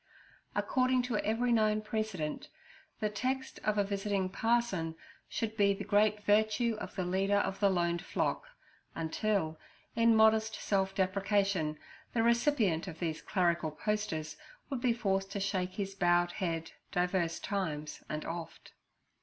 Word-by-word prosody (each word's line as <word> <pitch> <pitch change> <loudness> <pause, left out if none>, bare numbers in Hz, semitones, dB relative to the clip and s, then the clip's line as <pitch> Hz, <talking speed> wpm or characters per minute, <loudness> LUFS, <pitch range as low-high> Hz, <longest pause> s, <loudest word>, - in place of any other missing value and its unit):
According 255 -1 +2
to 245 -3 -1
every 230 +4 +1
known 215 -2 +3
precedent, 210 -8 -3 0.5
the 215 - +2
text 260 +5 -2
of 215 0 +1
a 205 - +4
visiting 200 -1 -1
parson 200 -6 0 0.3
should 220 -1 -2
be 200 -2 +4
the - - -5
great 210 0 +2
virtue 215 +3 +3
of - - -7
the 185 -2 -1
leader 195 +3 +2
of 195 -1 -1
the 200 -1 +4
loaned 175 -2 +1
flock, - - -1 0.5
until, 165 0 -1 0.4
in 230 0 +5
modest 220 0 +4
self 195 -1 0
deprecation, 195 -4 +1 0.4
the 225 - +3
recipient 235 - +2
of 165 -3 -7
these 165 -2 -3
clerical 170 -4 +1
posters 160 -3 -2 0.3
would 265 -3 -2
be 250 -1 +3
forced 195 -4 0
to 200 - -2
shake 185 -2 -1
his 195 -1 -3
bowed 175 -2 +3
head 165 -4 -3 0.2
divers 180 -1 0
times 155 -7 -3
and 155 0 -3
oft. 165 0 -7
200 Hz, 145 wpm, -32 LUFS, 175-220 Hz, 0.5 s, in